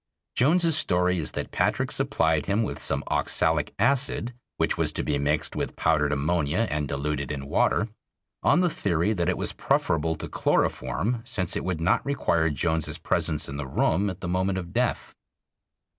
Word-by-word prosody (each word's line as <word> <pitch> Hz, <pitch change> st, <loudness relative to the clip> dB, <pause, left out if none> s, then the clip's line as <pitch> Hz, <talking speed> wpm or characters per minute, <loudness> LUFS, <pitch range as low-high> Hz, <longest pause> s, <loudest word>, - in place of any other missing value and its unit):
Jones's 165 Hz, +4 st, +3 dB
story 90 Hz, -, +2 dB
is 75 Hz, -, -2 dB
that -, -, -4 dB
Patrick -, -, 0 dB
supplied 80 Hz, -2 st, +1 dB
him 100 Hz, +3 st, +1 dB
with -, -, -4 dB
some -, -, +2 dB
oxalic 80 Hz, -2 st, +1 dB
acid 125 Hz, 0 st, +1 dB, 0.2 s
which -, -, +1 dB
was -, -, 0 dB
to -, -, -1 dB
be 70 Hz, -1 st, 0 dB
mixed 75 Hz, +2 st, 0 dB
with -, -, -3 dB
powdered 75 Hz, -3 st, +2 dB
ammonia 80 Hz, +7 st, 0 dB
and 75 Hz, -1 st, -1 dB
diluted 70 Hz, 0 st, -3 dB
in 70 Hz, -2 st, -5 dB
water, 105 Hz, +9 st, +1 dB, 0.5 s
on 175 Hz, -, +4 dB
the 180 Hz, -, +3 dB
theory 90 Hz, -, 0 dB
that 85 Hz, -3 st, 0 dB
it 95 Hz, -, 0 dB
was -, -, -1 dB
preferable 80 Hz, +1 st, 0 dB
to -, -, -6 dB
chloroform 115 Hz, +3 st, 0 dB
since 90 Hz, -6 st, -2 dB
it -, -, -2 dB
would 90 Hz, -3 st, -2 dB
not 85 Hz, +4 st, +2 dB
require 85 Hz, -, +1 dB
Jones's 80 Hz, +2 st, -1 dB
presence 75 Hz, -2 st, -1 dB
in 70 Hz, -, -6 dB
the 75 Hz, -2 st, -4 dB
room 90 Hz, +9 st, +1 dB
at 95 Hz, 0 st, -7 dB
the 90 Hz, -, -4 dB
moment 95 Hz, +2 st, 0 dB
of 90 Hz, -1 st, -6 dB
death. 125 Hz, 0 st, -1 dB
85 Hz, 175 wpm, -26 LUFS, 75-100 Hz, 0.5 s, on